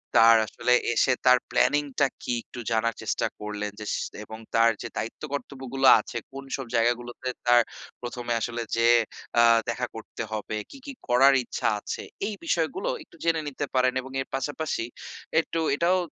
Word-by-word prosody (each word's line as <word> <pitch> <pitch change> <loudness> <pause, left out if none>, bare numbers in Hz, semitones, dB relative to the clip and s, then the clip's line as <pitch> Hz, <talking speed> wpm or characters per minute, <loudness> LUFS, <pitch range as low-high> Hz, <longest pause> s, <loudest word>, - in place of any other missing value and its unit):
তার 115 0 +8
আসলে 125 - +1 0.2
এসে 125 +2 +3
তার 125 0 +8
প্ল্যানিং 145 0 +3 0.2
টা 140 - +5 0.2
কি? 125 - -1
একটু 125 - -10
জানার 115 0 +1
চেষ্টা - - -1
করলেন 105 0 -4
যে 105 - -6
সেস - - -2 0.2
এবং 110 +1 -9 0.2
তার 115 0 +6
যে - - -4
দায়িত্ব 110 - -5
কর্তব্যগুলো 135 -1 -1
আছে, 120 - -6
কোন 135 0 -7
সব 135 - -5
জায়গাগুলোতে 120 +2 0 0.2
তার 120 0 +7 0.4
১ম 120 0 -5
এ - - +4
আসলে 120 0 -2
যেয়ে 115 +1 +5 0.4
আ - - +7 0.3
দেখা 125 +1 -1
করতে 110 0 -6
হবে, 110 0 -3 0.2
কী, - - -10
কী, 280 - -6 0.2
করার 135 +3 +6
ইচ্ছা - - -2
আছে, - - -5 0.2
এই 215 - -3
বিষয়গুলো - - 0
একটু - - -21
জেনে 165 -1 +2
নিতে 145 +1 -3
পারেন 130 0 +3
এবং 130 +1 -10
এর - - -6
পাশাপাশি 145 -2 -2 0.6
একটু 165 - -10 0.2
এটাও 175 +4 +3
125 Hz, 175 wpm, -26 LUFS, 115-135 Hz, 0.6 s, তার